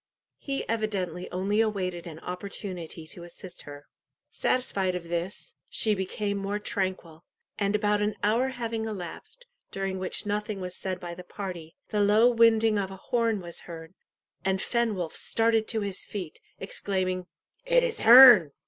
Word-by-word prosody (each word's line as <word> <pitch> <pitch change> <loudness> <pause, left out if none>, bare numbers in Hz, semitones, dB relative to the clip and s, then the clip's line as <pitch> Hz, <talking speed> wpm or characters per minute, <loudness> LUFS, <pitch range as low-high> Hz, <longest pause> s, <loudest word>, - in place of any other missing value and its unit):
He 275 -1 -4
evidently 195 -6 -2
only 195 +4 +1
awaited 185 -6 -2
an 160 -2 -8
opportunity 180 -3 -6
to 170 +2 -7
assist 175 +2 -9
her. 145 0 -10 0.5
Satisfied 195 -8 0
of 170 -2 -6
this, 175 +4 -4 0.2
she 220 -3 +1
became 200 +1 -2
more 200 +1 -2
tranquil, 185 -6 -3 0.4
and 200 0 +1
about 210 0 +2
an 210 0 0
hour 230 +5 +3
having 230 -3 -3
elapsed, 220 - -7 0.2
during 195 -1 -3
which 185 +2 -3
nothing 210 0 -2
was 180 -1 -5
said 185 -1 -3
by 175 -2 -6
the 180 - -9
party, 180 -4 -7
the 210 -2 +1
low 210 +4 +5
winding 225 -2 +4
of 195 -1 -2
a 195 - -8
horn 230 0 0
was 170 -1 -5
heard, 165 0 -9 0.5
and 190 0 +1
Fenwolf 210 -8 -1
started 225 -1 +1
to 220 -2 0
his 200 -2 -2
feet, 180 -7 -6 0.2
exclaiming 185 -2 -2 0.4
"It - - +3
is 480 -2 -1
Herne!" 235 - +9
200 Hz, 155 wpm, -27 LUFS, 180-220 Hz, 0.5 s, Herne